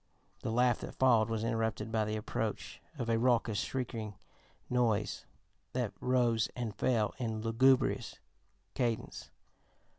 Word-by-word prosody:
'" -, -, -34 dB
The -, -, -2 dB
laugh 125 Hz, 0 st, +3 dB
that -, -, -7 dB
followed 120 Hz, -4 st, +4 dB
was 110 Hz, -1 st, -1 dB
interrupted 110 Hz, -2 st, -1 dB
by 110 Hz, -1 st, +1 dB
the 105 Hz, 0 st, -2 dB
approach 95 Hz, -8 st, -3 dB, 0.2 s
of 120 Hz, -4 st, -3 dB
a 115 Hz, -1 st, +2 dB
raucous, 115 Hz, -3 st, +2 dB
shrieking 115 Hz, -5 st, -3 dB, 0.5 s
noise 115 Hz, -4 st, 0 dB, 0.5 s
that -, -, -1 dB
rose 120 Hz, -3 st, +2 dB
and 120 Hz, -4 st, -3 dB
fell 110 Hz, -2 st, +1 dB
in 110 Hz, -3 st, -2 dB
lugubrious 125 Hz, +3 st, +3 dB, 0.6 s
cadence. 120 Hz, -3 st, -2 dB
115 Hz, 130 wpm, -32 LUFS, 110-125 Hz, 0.6 s, followed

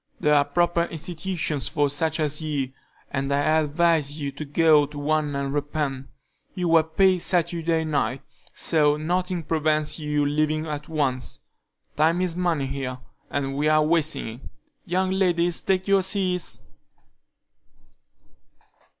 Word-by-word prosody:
There 150 Hz, -, +3 dB
are 145 Hz, -1 st, +4 dB
proper 170 Hz, +3 st, +1 dB
institutions 165 Hz, -3 st, -3 dB
for 145 Hz, -1 st, +1 dB
such 155 Hz, +3 st, -1 dB
as 150 Hz, 0 st, -1 dB
you, 145 Hz, -4 st, -2 dB, 0.4 s
and 135 Hz, 0 st, -2 dB
I 145 Hz, +3 st, +3 dB
advise 155 Hz, -1 st, +1 dB
you 140 Hz, -1 st, -3 dB
to 155 Hz, -, -7 dB
go 150 Hz, 0 st, +4 dB
to 150 Hz, -, -11 dB
one 150 Hz, 0 st, 0 dB
and 140 Hz, 0 st, -2 dB
repent. 145 Hz, -2 st, -2 dB, 0.5 s
You 180 Hz, -3 st, -1 dB
were 165 Hz, -1 st, +6 dB
paid 185 Hz, +4 st, +2 dB
Saturday 170 Hz, -2 st, +1 dB
night, 135 Hz, -5 st, -1 dB, 0.3 s
so 150 Hz, -2 st, +2 dB
nothing 180 Hz, +2 st, -1 dB
prevents 155 Hz, 0 st, 0 dB
your 150 Hz, -1 st, 0 dB
leaving 155 Hz, +1 st, 0 dB
at 150 Hz, -1 st, -5 dB
once. 135 Hz, -5 st, -2 dB, 0.6 s
Time 160 Hz, +3 st, +3 dB
is 180 Hz, -2 st, -1 dB
money 170 Hz, -6 st, 0 dB
here, 135 Hz, -2 st, -4 dB, 0.3 s
and 135 Hz, -1 st, -2 dB
we 150 Hz, +2 st, +1 dB
are 155 Hz, 0 st, +4 dB
wasting 155 Hz, -3 st, +1 dB
it. 115 Hz, +2 st, -8 dB, 0.5 s
Young 185 Hz, +1 st, 0 dB
ladies, 175 Hz, -3 st, +2 dB
take 190 Hz, 0 st, 0 dB
your 195 Hz, -1 st, +4 dB
seats." 185 Hz, -2 st, 0 dB
155 Hz, 140 wpm, -24 LUFS, 145-170 Hz, 0.6 s, were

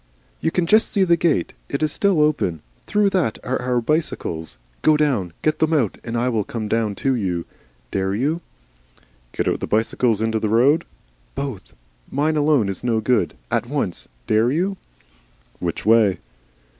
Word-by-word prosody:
"You -, -, +1 dB
can 175 Hz, +1 st, 0 dB
just 215 Hz, +6 st, +4 dB
see 200 Hz, -, +3 dB
the 170 Hz, -2 st, +4 dB
gate. 170 Hz, -2 st, +1 dB, 0.2 s
It 140 Hz, +2 st, -2 dB
is 155 Hz, -, +1 dB
still 195 Hz, -2 st, +2 dB
open. 140 Hz, -, +1 dB, 0.2 s
Through 205 Hz, -1 st, +2 dB
that 170 Hz, -, 0 dB
are 130 Hz, 0 st, -2 dB
our 125 Hz, 0 st, +1 dB
bicycles. 100 Hz, -, -2 dB, 0.2 s
Go 155 Hz, -1 st, +4 dB
down, 130 Hz, -, +1 dB
get 155 Hz, 0 st, +1 dB
them 160 Hz, +1 st, +2 dB
out, 125 Hz, -10 st, +1 dB
and 115 Hz, 0 st, -3 dB
I 120 Hz, +2 st, +1 dB
will 115 Hz, -4 st, +1 dB
come 110 Hz, +1 st, -5 dB
down 110 Hz, -2 st, 0 dB
to 135 Hz, -, +4 dB
you. 90 Hz, -8 st, -1 dB, 0.5 s
Dare 95 Hz, 0 st, 0 dB
you? 150 Hz, +9 st, 0 dB, 0.9 s
"Get -, -, -2 dB
your -, -, 0 dB
bicycle 115 Hz, +3 st, +1 dB
out 110 Hz, -2 st, +1 dB
in 110 Hz, 0 st, +1 dB
the 110 Hz, -1 st, 0 dB
road?" 130 Hz, +8 st, +4 dB, 0.5 s
"Both. 135 Hz, -7 st, -5 dB, 0.4 s
Mine 150 Hz, +3 st, 0 dB
alone 145 Hz, -7 st, +3 dB
is 95 Hz, -1 st, -5 dB
no 115 Hz, -2 st, +1 dB
good. 120 Hz, +3 st, +1 dB, 0.2 s
At -, -, 0 dB
once. 135 Hz, -10 st, -3 dB, 0.2 s
Dare 110 Hz, -, +3 dB
you?" 185 Hz, +7 st, 0 dB, 0.8 s
"Which 85 Hz, +1 st, -3 dB
way?" 110 Hz, -3 st, +4 dB
125 Hz, 170 wpm, -21 LUFS, 110-155 Hz, 0.9 s, just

